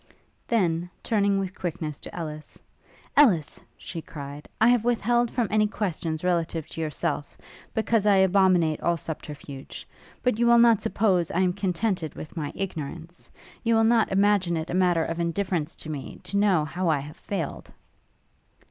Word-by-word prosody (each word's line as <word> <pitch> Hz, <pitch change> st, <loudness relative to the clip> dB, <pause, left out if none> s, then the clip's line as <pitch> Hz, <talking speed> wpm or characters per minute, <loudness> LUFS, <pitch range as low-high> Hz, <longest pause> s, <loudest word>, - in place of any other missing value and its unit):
then, 175 Hz, -6 st, +1 dB
turning 200 Hz, -3 st, +2 dB
with 190 Hz, -1 st, -3 dB
quickness 160 Hz, -5 st, -4 dB
to -, -, -10 dB
Ellis: 155 Hz, -2 st, -7 dB, 0.6 s
'Ellis,' 200 Hz, -, +4 dB, 0.2 s
she 165 Hz, -, -7 dB
cried, 145 Hz, -1 st, -9 dB
'I 225 Hz, -, +6 dB
have 245 Hz, -3 st, +3 dB
withheld 240 Hz, 0 st, +2 dB
from 240 Hz, -2 st, 0 dB
any 215 Hz, 0 st, +3 dB
questions 170 Hz, -6 st, -3 dB
relative 170 Hz, -3 st, 0 dB
to 165 Hz, -, -6 dB
yourself, 155 Hz, -1 st, -3 dB, 0.4 s
because 220 Hz, -1 st, +1 dB
I 205 Hz, -, +6 dB
abominate 185 Hz, -4 st, +3 dB
all 170 Hz, 0 st, +1 dB
subterfuge; 145 Hz, -3 st, -8 dB, 0.4 s
but 250 Hz, -3 st, +1 dB
you 235 Hz, -, +3 dB
will 235 Hz, 0 st, +7 dB
not 235 Hz, -3 st, +6 dB
suppose 200 Hz, -5 st, +1 dB
I 185 Hz, -, 0 dB
am 180 Hz, -1 st, +2 dB
contented 185 Hz, -3 st, -1 dB
with 155 Hz, -, -9 dB
my 150 Hz, -4 st, -3 dB
ignorance? 170 Hz, -2 st, -6 dB, 0.3 s
You 230 Hz, -1 st, +3 dB
will 225 Hz, -, +4 dB
not 225 Hz, 0 st, +3 dB
imagine 195 Hz, -3 st, +3 dB
it 160 Hz, +1 st, -4 dB
a -, -, -3 dB
matter 180 Hz, -3 st, +3 dB
of 165 Hz, +1 st, -4 dB
indifference 170 Hz, -2 st, -1 dB
to -, -, -7 dB
me, 145 Hz, -3 st, -7 dB
to -, -, -4 dB
know 195 Hz, -7 st, +3 dB
how 175 Hz, +4 st, -2 dB
I 150 Hz, -3 st, +2 dB
have 150 Hz, +2 st, -9 dB
failed?' 175 Hz, -8 st, -5 dB
180 Hz, 165 wpm, -26 LUFS, 160-210 Hz, 0.6 s, will